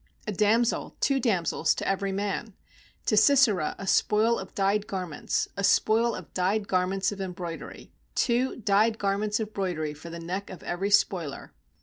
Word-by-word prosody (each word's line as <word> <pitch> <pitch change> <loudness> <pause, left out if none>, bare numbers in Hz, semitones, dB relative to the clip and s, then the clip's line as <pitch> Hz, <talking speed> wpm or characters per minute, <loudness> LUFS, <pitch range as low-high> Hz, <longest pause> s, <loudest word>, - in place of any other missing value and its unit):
A 215 - -2
damsel, 220 +4 +1
two 275 -1 +2
damsels 200 -9 +1
to - - -4
every 195 0 0
man; 205 +2 -3 0.5
To 215 - +2
Sisera 215 - +4
a 195 - -7
spoil 215 +4 +2
of 190 - -9
dyed 200 +1 +1
garments, 180 -6 -2
A 200 - -3
spoil 225 +3 +3
of 185 - -10
dyed 200 +3 0
garments 190 +2 +1
of 200 -1 -6
em 185 -2 -4
broidery, 170 -2 -8 0.2
Two 245 +1 +1
dyed 220 0 +2
garments 205 +1 0
of 215 -1 -4
broidery 170 -6 -2
for 155 +3 -11
the 170 - -7
neck 185 +4 -4
of 185 - -10
every 190 +3 -2
spoiler?' 175 - +1
200 Hz, 165 wpm, -27 LUFS, 185-215 Hz, 0.5 s, Sisera